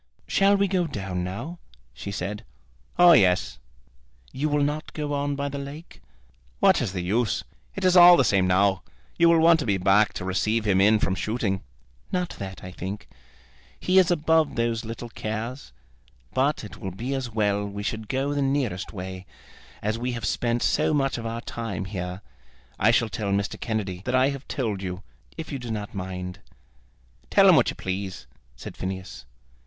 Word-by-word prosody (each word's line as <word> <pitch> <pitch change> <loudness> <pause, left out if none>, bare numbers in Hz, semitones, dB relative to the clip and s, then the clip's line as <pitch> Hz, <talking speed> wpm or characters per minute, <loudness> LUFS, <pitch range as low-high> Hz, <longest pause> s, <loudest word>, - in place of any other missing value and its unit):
"Shall 200 +1 +4
we 200 0 +2
go 180 -2 0
down 95 - -4
now?" 140 - -6 0.3
she 65 +11 -7
said. 100 +3 -4 0.5
"Oh, 175 0 +8
yes." 95 - +3 0.7
"You 145 +4 -1
will 145 0 +2
not 150 +2 -2
go 150 -1 -3
on 145 0 -1
by 140 0 -2
the 140 0 -5
lake?" 140 +4 -9 0.6
"What - - +4
is 95 - -2
the 90 -2 -3
use? 110 +5 0 0.3
It 195 - -2
is 185 0 +4
all 175 0 +10
the 135 - +4
same 95 -4 +3
now. 95 +1 +3 0.4
You 170 0 +6
will 170 - +5
want 165 0 +6
to 145 - -2
be 100 -2 +2
back 95 +2 +4
to 90 - -5
receive 105 +4 0
him 95 -2 +3
in 105 +2 +5
from 95 - 0
shooting." 100 -1 -1 0.5
"Not 180 -1 -1
that, 95 -2 -7
I 90 - -7
think. 95 +3 -6 0.7
He 185 +1 +4
is 185 - +4
above 160 -2 +2
those 115 0 0
little 115 +1 -7
cares. 115 +4 -5 0.6
But 140 +1 +1
it 105 - -9
will 95 - -5
be 115 +9 -4
as 135 -2 -3
well 105 -2 0
we 100 0 -5
should 110 0 -4
go 135 +2 0
the 145 - 0
nearest 135 -9 -1
way, 95 -1 -7 0.6
as 110 +2 -1
we 125 +1 -2
have 115 -2 -4
spent 120 +2 0
so 155 - +2
much 135 -3 0
of 115 - -4
our 115 +1 -4
time 115 -6 -5
here. 90 -1 -5 0.6
I 105 - +4
shall 115 0 +3
tell 100 +1 -3
Mr. 100 +1 -1
Kennedy 100 -5 -3
that 125 - 0
I 130 +1 +4
have 140 -1 -6
told 110 -7 -2
you, 90 0 -5 0.3
if 160 -1 -6
you 140 - -3
do 125 -1 -7
not 105 -2 -4
mind." 90 -1 -5 0.9
"Tell - - +6
him - - +8
what - - +4
you - - -5
please," 95 0 -4 0.3
said - - -9
Phineas. 95 -7 -6
110 Hz, 190 wpm, -25 LUFS, 95-140 Hz, 0.9 s, all